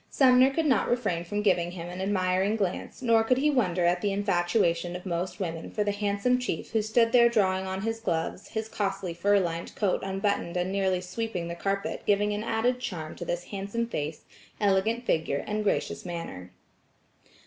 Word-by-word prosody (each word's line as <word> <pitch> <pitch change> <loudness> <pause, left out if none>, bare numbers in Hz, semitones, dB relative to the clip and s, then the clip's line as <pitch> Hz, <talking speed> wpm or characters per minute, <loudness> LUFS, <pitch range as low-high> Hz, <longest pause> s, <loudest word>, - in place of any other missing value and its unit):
Sumner 255 -1 +5
could 315 +4 -1
not 265 -6 +2
refrain 205 -9 0
from 205 +4 -2
giving 180 -4 +2
him 175 -1 -7
an 180 +1 -6
admiring 190 +1 +1
glance 200 +4 -3
nor 230 -2 +4
could 250 +3 +2
he 300 +3 +3
wonder 185 -10 +1
at 175 +1 +2
the 205 - +1
infatuation 175 -3 +1
of 180 - -7
most 175 +1 -3
women 165 -4 -4
for 210 - -1
the 205 - 0
handsome 205 +4 +1
chief 250 -10 -4
who 220 -1 +2
stood 230 +2 +2
there 235 -1 +6
drawing 190 -4 +1
on 190 +1 -3
his 225 0 -2
gloves, 170 -3 -2
his 220 0 -4
costly 195 -4 -2
fur 200 +4 +3
lined 170 -2 -3
coat 200 -4 +1
unbuttoned 195 -2 -1
and 180 +1 -1
nearly 190 -2 +1
sweeping 185 -2 -4
the - - -3
carpet 195 +3 -2
giving 205 0 +3
an 205 +1 -3
added 230 +2 0
charm 165 -10 -5
to 175 - -5
this 175 +1 -2
handsome 200 +4 -2
face, 150 -8 -4 0.3
elegant 215 +4 +1
figure 160 -6 0
and 215 0 -2
gracious 205 - -1
manner. 165 - -6
195 Hz, 190 wpm, -28 LUFS, 175-220 Hz, 0.3 s, there